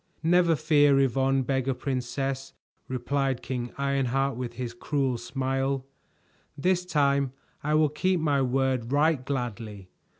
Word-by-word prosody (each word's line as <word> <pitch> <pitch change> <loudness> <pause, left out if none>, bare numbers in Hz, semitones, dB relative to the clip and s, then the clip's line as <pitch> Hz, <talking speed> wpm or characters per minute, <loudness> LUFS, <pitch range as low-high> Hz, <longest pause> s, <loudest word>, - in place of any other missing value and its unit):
"Never 170 0 +4
fear, 145 -3 +4
Yvonne, 135 0 +2
Beggar 130 0 0
Princess," 135 +1 -3 0.3
replied 130 +1 -1
King 125 -1 -4
Ironheart 135 -1 0
with 120 -1 -5
his 120 -1 -5
cruel 130 0 -1
smile. 135 +2 -2 0.7
"This 180 +3 +1
time 140 -5 +2 0.3
I 150 +1 +1
will 155 -1 +4
keep 185 +5 0
my 145 -3 +2
word 130 -2 0
right 145 -1 +2
gladly. 115 -7 -4
135 Hz, 125 wpm, -27 LUFS, 125-145 Hz, 0.7 s, Never